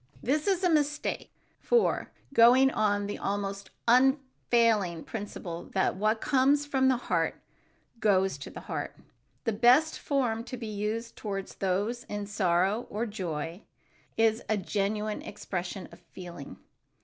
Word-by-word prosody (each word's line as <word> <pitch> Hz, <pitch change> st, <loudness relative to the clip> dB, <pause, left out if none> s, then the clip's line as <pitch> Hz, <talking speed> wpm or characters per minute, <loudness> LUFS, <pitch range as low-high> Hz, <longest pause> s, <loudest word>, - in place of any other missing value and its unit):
This 295 Hz, -, 0 dB
is 385 Hz, -2 st, +1 dB
a 360 Hz, -, +4 dB
mistake, 300 Hz, -1 st, 0 dB, 0.3 s
for, 475 Hz, -2 st, +2 dB, 0.2 s
going 255 Hz, +3 st, +7 dB
on 205 Hz, -3 st, +1 dB
the 205 Hz, -, -5 dB
almost 200 Hz, -1 st, -3 dB, 0.2 s
unfailing 235 Hz, -, +3 dB
principle 195 Hz, -5 st, -6 dB
that 190 Hz, -, +2 dB
what 215 Hz, +3 st, +1 dB
comes 280 Hz, +3 st, +3 dB
from 265 Hz, -2 st, +2 dB
the 260 Hz, -1 st, +3 dB
heart, 245 Hz, -, -1 dB, 0.6 s
goes 195 Hz, -3 st, +2 dB
to -, -, -7 dB
the -, -, -9 dB
heart, -, -, -5 dB, 0.5 s
the 230 Hz, -, 0 dB
best 250 Hz, +9 st, +4 dB
form 245 Hz, -6 st, 0 dB
to 255 Hz, -, -6 dB
be 235 Hz, -, -6 dB
used 215 Hz, +2 st, -3 dB
toward 195 Hz, -2 st, -4 dB
those 205 Hz, +6 st, -1 dB
in 205 Hz, 0 st, -4 dB
sorrow 195 Hz, +2 st, +1 dB
or 220 Hz, +3 st, -2 dB
joy 175 Hz, -4 st, -4 dB, 0.6 s
is 225 Hz, 0 st, +3 dB
a 215 Hz, -, +2 dB
genuine 210 Hz, +2 st, -2 dB
expression 185 Hz, -2 st, -5 dB
of -, -, -14 dB
feeling. 175 Hz, -6 st, -10 dB
215 Hz, 135 wpm, -29 LUFS, 195-255 Hz, 0.6 s, going